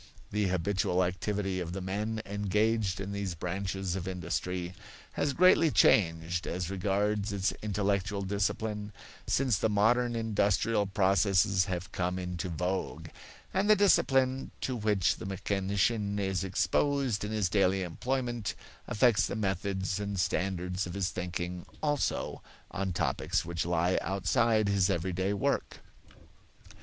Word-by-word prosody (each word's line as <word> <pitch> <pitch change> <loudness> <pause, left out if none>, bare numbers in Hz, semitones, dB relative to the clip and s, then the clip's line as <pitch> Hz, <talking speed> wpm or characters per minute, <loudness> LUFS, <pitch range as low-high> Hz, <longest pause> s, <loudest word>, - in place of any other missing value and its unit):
The 105 -1 +1
habitual 95 0 +1
activity 95 +1 -2
of 85 -1 -4
the 95 - -3
men 105 +4 -3
engaged 105 0 0
in 100 0 -4
these 100 -3 -3
branches 95 +2 -3
of 95 -1 -4
industry 90 0 -3 0.4
has 145 - 0
greatly 170 +1 +5
changed, 85 - +3
as 90 +1 -3
regards 100 +2 0
its 100 -1 0
intellectual 100 -1 -1
discipline, 105 +1 -2 0.3
since 125 -7 +2
the 110 - +2
modern 120 +4 +2
industrial 105 -1 +1
processes 95 -1 +3
have 90 -1 -4
come 90 0 -1
into 90 0 -4
vogue; 90 +3 -3 0.4
and 195 +3 +1
the 215 - +8
discipline 135 -10 +3
to 130 - -2
which 105 -5 +1
the - - -8
mechanician 100 +2 0
is 95 -2 -1
exposed 130 +4 +1
in 105 - -3
his 105 -4 +1
daily 95 0 +2
employment 120 +4 -2 0.3
affects 110 -1 +3
the - - -4
methods 95 -1 -1
and 100 -2 -3
standards 90 0 -1
of 85 - -7
his 100 -2 -1
thinking 90 0 -4 0.2
also 145 -2 -1 0.3
on 95 +1 -2
topics 85 - -1
which 85 0 -2
lie 90 +1 +2
outside 105 +4 +2
his 100 -1 +2
everyday 95 +1 -1
work. 100 - -1
100 Hz, 130 wpm, -30 LUFS, 90-105 Hz, 0.4 s, the